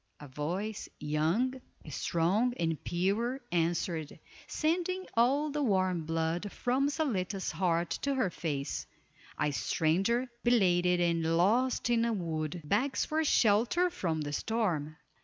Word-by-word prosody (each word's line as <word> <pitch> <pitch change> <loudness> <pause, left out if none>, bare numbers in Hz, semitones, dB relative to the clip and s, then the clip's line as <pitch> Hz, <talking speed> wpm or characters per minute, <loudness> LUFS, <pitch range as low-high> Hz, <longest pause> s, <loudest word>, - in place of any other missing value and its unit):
A 145 - -10
voice, 175 +10 -4
young, 165 - 0 0.3
strong, 180 - +1
and 165 -3 -1
pure, 205 +9 0
answered, 165 -2 -1 0.3
sending 360 +4 -1
all 275 +6 +2
the 295 +1 -2
warm 185 - +1
blood 165 +4 -1
from 260 +3 0
Zaletta's 200 - -1
heart 170 0 0
to 280 -1 0
her 225 -9 +1
face: 145 -5 -3 0.5
"A 150 -1 +1
stranger, 195 - +1 0.2
belated 180 -7 +3
and 165 -1 +1
lost 235 +10 +2
in 235 -1 +3
the 235 0 +1
wood, 165 -3 -3
begs 265 - +1
for 315 +1 0
shelter 245 - +3
from 165 - -2
the 145 -1 -4
storm." 165 -8 -1
185 Hz, 125 wpm, -31 LUFS, 165-245 Hz, 0.5 s, belated